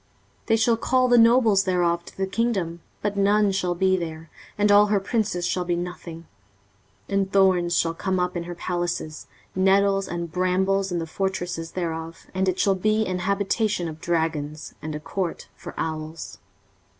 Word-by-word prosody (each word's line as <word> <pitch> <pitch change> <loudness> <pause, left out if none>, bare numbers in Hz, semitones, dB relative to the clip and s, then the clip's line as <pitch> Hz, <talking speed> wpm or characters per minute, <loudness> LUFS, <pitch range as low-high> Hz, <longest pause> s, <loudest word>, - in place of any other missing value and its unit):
23:034:012 - - -35
They 225 - +4
shall 225 +1 +3
call 255 +2 +2
the 245 -1 +5
nobles 230 -4 +5
thereof 175 -2 +1
to - - -14
the 190 - 0
kingdom, 190 -5 -1 0.2
but 205 -1 -1
none 200 +1 +3
shall 180 -2 -1
be 190 +1 +3
there, 160 -2 -5 0.3
and 205 0 +3
all 205 +1 +7
her 205 -1 +2
princes 200 -3 -1
shall 180 +1 0
be 175 -1 -1
nothing. 170 -1 -6 0.8
23:034:013 200 - -1
And 195 0 -3
thorns 185 -3 +3
shall 165 0 +1
come 185 +2 -1
up 180 0 -1
in 170 -1 -3
her 175 0 -6
palaces, 175 -3 -3 0.3
nettles 195 +1 +3
and 170 -1 -4
brambles 190 +2 +1
in 175 - -1
the 165 - -2
fortresses 175 -2 -3
thereof: 165 -2 -4
and 190 0 +1
it 185 - -2
shall 195 - +3
be 215 +3 +1
an 185 -2 -2
habitation 200 0 0
of 160 0 -8
dragons, 160 -3 -2
and 155 -1 -5
a - - -4
court 175 +3 -4
for - - -10
owls. 155 0 -5
185 Hz, 180 wpm, -24 LUFS, 170-200 Hz, 0.8 s, all